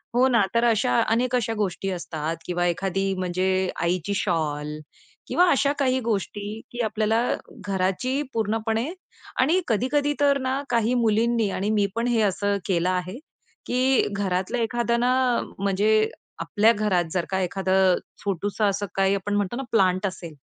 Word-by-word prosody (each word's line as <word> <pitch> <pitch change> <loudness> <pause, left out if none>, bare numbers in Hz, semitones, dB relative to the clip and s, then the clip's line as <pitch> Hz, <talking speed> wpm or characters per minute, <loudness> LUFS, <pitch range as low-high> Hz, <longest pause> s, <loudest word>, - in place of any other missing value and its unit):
हो 255 +2 +5
ना. 235 -4 +3
तर 235 - +3
अशा 200 - +2
अनेक 245 +2 +1
अशा 225 -2 0
गोष्टी 195 -1 -2
असतात 165 -2 -4
किंवा 175 0 -1
एखादी, 195 +2 -1
म्हणजे 185 +1 0
आईची 180 +3 0
शॉल 150 -3 -2 0.5
किंवा 360 0 +3
अशा 280 +1 +2
काही 260 -1 +2
गोष्टी 210 -1 -3
की 240 0 -3
आपल्याला 220 +1 +1 0.5
घराची 195 +9 0
पूर्णपणे 225 - -1 0.5
आणि 325 +8 +3
कधी-कधी 285 +6 +1
तर 280 -1 +4
ना, 260 +2 -1
काही 235 0 +2
मुलींनी 230 -1 +2
आणि 200 +3 -2
मी 205 -2 +2
पण 235 +1 0
हे 235 -2 +2
असं 200 0 +1
केलं 180 -1 +1
आहे 185 +6 -2 0.5
की 255 +1 +2
घरातलं 190 +2 -1
एखादं 235 +1 0
ना, 250 +1 +3 0.5
म्हणजे 210 +2 +2 0.3
आपल्या 205 +7 +3
घरात 205 -4 +1
जर 180 -2 -1
का 190 0 0
एखादं 190 0 +2 0.3
छोटसं 205 +2 -1
असं 200 +1 0 0.2
आपण 195 +1 +1
म्हणतो 205 +2 -1
ना 270 - -3
प्लांट 185 -2 +2
असेल. 175 -4 -7
205 Hz, 150 wpm, -24 LUFS, 185-235 Hz, 0.5 s, हो